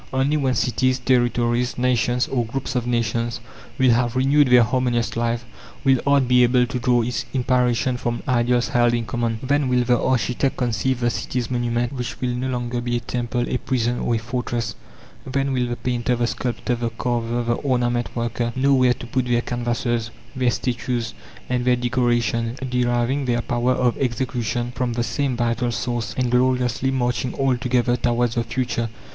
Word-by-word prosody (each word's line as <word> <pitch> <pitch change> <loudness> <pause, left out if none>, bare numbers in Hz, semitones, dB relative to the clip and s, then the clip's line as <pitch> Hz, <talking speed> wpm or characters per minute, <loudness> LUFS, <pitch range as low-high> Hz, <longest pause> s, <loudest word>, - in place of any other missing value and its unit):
Only 135 +3 +1
when 135 -4 +1
cities, 130 +2 +1
territories, 120 -1 +1
nations, 125 0 +1
or 125 -3 0
groups 130 +3 -4
of 125 -1 -1
nations, 115 0 -1 0.4
will 130 -1 +4
have 120 0 +1
renewed 140 +2 +4
their 125 -1 +6
harmonious 120 -1 0
life, 115 0 -1 0.4
will 135 -2 +4
art 140 -2 +4
be 125 0 +5
able 125 0 +4
to 125 +1 -4
draw 120 -1 +2
its 125 +2 -2
inspiration 125 -1 +1
from 120 -1 -3
ideals 120 -1 +2
held 120 -1 +3
in 115 -1 -2
common. 115 +1 -1
Then 140 +1 +1
will 125 -1 +2
the 120 0 +2
architect 130 +1 0
conceive 125 +1 0
the 120 0 +2
city's 125 0 -3
monument 120 0 -1
which 125 -1 -5
will 125 -1 -1
no 125 +2 -2
longer 120 -1 -2
be 120 0 -1
a - - -1
temple, 120 +1 -2
a - - 0
prison, 120 -2 -1
or 120 - 0
a - - +2
fortress; 120 -1 -3 0.5
then 135 +1 -1
will 125 -1 0
the 120 - -2
painter, 125 0 -1
the 120 0 0
sculptor, 125 +1 -2
the 120 -1 -1
carver, 120 0 -2
the 120 0 +1
ornament 120 -2 0
worker 120 0 -1
know 135 +2 +3
where 130 -2 +4
to - - -9
put 130 +1 -1
their 120 -1 +2
canvases, 120 -1 -1 0.3
their 130 -1 +2
statues, 120 -1 -2 0.3
and 125 -1 0
their 125 0 +3
decoration; 120 -1 0
deriving 125 +2 0
their 120 -1 0
power 120 +1 +1
of 125 -1 +1
execution 120 -1 -1
from 125 -2 -1
the 120 0 -1
same 125 +2 -1
vital 120 +1 0
source, 120 0 -3
and 125 -2 0
gloriously 125 0 +2
marching 125 -1 -1
all 135 -2 +2
together 125 -1 +1
towards 120 -1 +1
the 115 - 0
future. 115 0 -2
120 Hz, 180 wpm, -22 LUFS, 120-125 Hz, 0.5 s, their